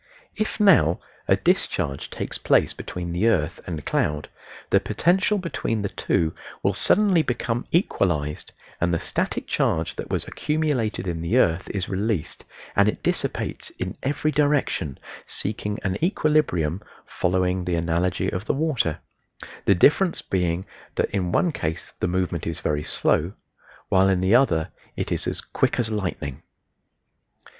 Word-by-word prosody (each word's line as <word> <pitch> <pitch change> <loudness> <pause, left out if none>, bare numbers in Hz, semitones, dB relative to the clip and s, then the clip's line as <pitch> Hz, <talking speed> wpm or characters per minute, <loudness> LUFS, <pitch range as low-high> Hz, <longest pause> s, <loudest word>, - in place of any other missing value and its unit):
If 215 +1 -2
now 160 - +5 0.3
a - - +5
discharge 70 -1 0
takes - - -4
place - - +3
between 85 -1 -5
the 90 +6 +1
earth 85 -7 +1
and 80 -5 -5
cloud 75 0 0 0.4
the - - +6
potential 190 +5 +2
between 140 - -2
the 100 - -1
two 80 -3 0 0.3
will 100 - +3
suddenly 190 - +4
become 120 -3 -2
equalized 80 - 0 0.3
and 85 +1 +2
the 85 - +1
static - - -2
charge 80 +1 0
that - - -5
was - - -2
accumulated 145 -11 -1
in 85 -2 -3
the 85 +9 +1
earth 85 -6 +2
is 95 -3 -2
released 100 -3 -2 0.3
and 100 +1 +5
it - - -5
dissipates - - -1
in - - -4
every 150 +3 0
direction, 145 - +1 0.3
seeking 105 0 -3
an 95 +7 -2
equilibrium, 145 - +2 0.2
following 90 0 0
the 90 -1 0
analogy 85 +2 0
of 90 +4 -4
the - - 0
water; 135 - 0 0.7
the 100 - +5
difference 165 - +4
being 90 -1 0 0.3
that - - 0
in 90 -3 -1
one 175 - +2
case 80 - -4
the - - +1
movement 90 -2 -1
is 85 - -3
very 75 -1 0
slow, 80 +4 +1 0.6
while 95 +1 +4
in 95 -2 +2
the 95 +3 +3
other 90 -11 +4 0.3
it - - -3
is - - -1
as - - -2
"quick - - 0
as 115 -2 0
lightning." 90 -10 -3
95 Hz, 150 wpm, -24 LUFS, 85-130 Hz, 0.7 s, the